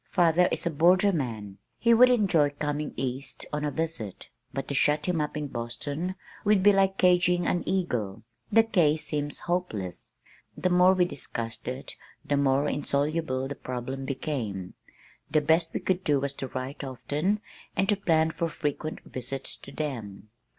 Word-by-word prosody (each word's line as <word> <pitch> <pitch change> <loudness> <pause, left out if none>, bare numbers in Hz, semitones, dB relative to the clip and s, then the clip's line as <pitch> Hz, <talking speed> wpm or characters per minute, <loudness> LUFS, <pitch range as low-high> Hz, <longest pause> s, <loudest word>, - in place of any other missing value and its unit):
Father 175 -1 +4
is - - -2
a 170 - +1
borderman. 145 - +2 0.2
He 235 0 +4
would 250 +2 +7
enjoy 190 -11 +4
coming 150 0 -2
east 130 +2 -4
on 150 0 -1
a 150 - +1
visit, 155 - -4 0.2
but 135 +1 -4
to - - -3
shut 150 +2 +2
him 175 -4 +1
up 150 0 -3
in 150 - -2
Boston 140 +8 -4 0.3
would 205 -2 +4
be 205 0 +7
like 195 0 +3
caging 180 -1 +4
an 175 - +1
eagle. 125 - -1 0.3
The 225 +2 +6
case 160 -9 +2
seems 145 -1 -2
hopeless." 170 - -3 0.5
The 185 - +1
more 180 +1 +6
we 180 -1 +4
discussed 115 -7 -6
it 130 +2 -5 0.3
the 145 - +1
more 140 0 +2
insoluble 145 -2 0
the 140 - -4
problem 130 +1 -5
became. 125 - -3 0.6
The 155 - +3
best 160 +2 +2
we - - -2
could 185 0 0
do 145 -2 +3
was 140 0 -2
to 135 - -4
write 130 +3 -5
often 145 - -1 0.4
and 195 +1 +2
to 210 - +4
plan 160 -5 +2
for 165 +1 -2
frequent 155 0 -3
visits 130 +2 -6
to - - -12
them. 110 -9 -5
150 Hz, 165 wpm, -28 LUFS, 135-180 Hz, 0.6 s, would